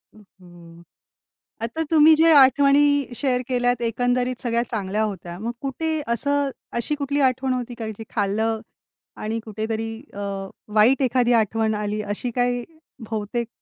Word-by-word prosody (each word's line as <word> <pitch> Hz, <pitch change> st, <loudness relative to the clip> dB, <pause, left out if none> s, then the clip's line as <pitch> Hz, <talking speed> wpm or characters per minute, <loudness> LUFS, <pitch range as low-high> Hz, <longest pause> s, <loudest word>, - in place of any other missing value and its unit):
हं, 215 Hz, -, -17 dB, 0.2 s
हं, 170 Hz, -1 st, -15 dB, 0.8 s
आता 235 Hz, +8 st, -2 dB
तुम्ही 315 Hz, 0 st, +7 dB
ज्या 320 Hz, -1 st, +6 dB
आठवणी 280 Hz, 0 st, +4 dB
शेअर 250 Hz, 0 st, 0 dB
केल्यात 245 Hz, -1 st, +1 dB
एकंदरीत 245 Hz, +2 st, 0 dB
सगळ्या 235 Hz, -1 st, +1 dB
चांगल्या 210 Hz, -1 st, -1 dB
होत्या. 180 Hz, -4 st, -5 dB
मग 230 Hz, +3 st, -3 dB
कुठे 315 Hz, +3 st, -2 dB
असं 285 Hz, +3 st, 0 dB, 0.3 s
अशी 295 Hz, +6 st, -1 dB
कुठली 285 Hz, 0 st, -2 dB
आठवण 260 Hz, +1 st, -2 dB
होती 250 Hz, -1 st, -4 dB
का? 225 Hz, -, -3 dB
जी 220 Hz, +1 st, -7 dB
खाल्लं 220 Hz, +2 st, 0 dB, 0.6 s
आणि 220 Hz, +2 st, -2 dB
कुठेतरी 220 Hz, +1 st, -3 dB, 0.2 s
अ, 200 Hz, -, -8 dB, 0.6 s
वाईट 240 Hz, +6 st, +5 dB
एखादी 245 Hz, -1 st, +2 dB
आठवण 220 Hz, 0 st, 0 dB
आली 210 Hz, 0 st, -2 dB
अशी 210 Hz, +4 st, -4 dB
काही 245 Hz, -1 st, +1 dB, 0.5 s
बहुतेक 220 Hz, +2 st, -3 dB
235 Hz, 140 wpm, -23 LUFS, 215-265 Hz, 0.8 s, तुम्ही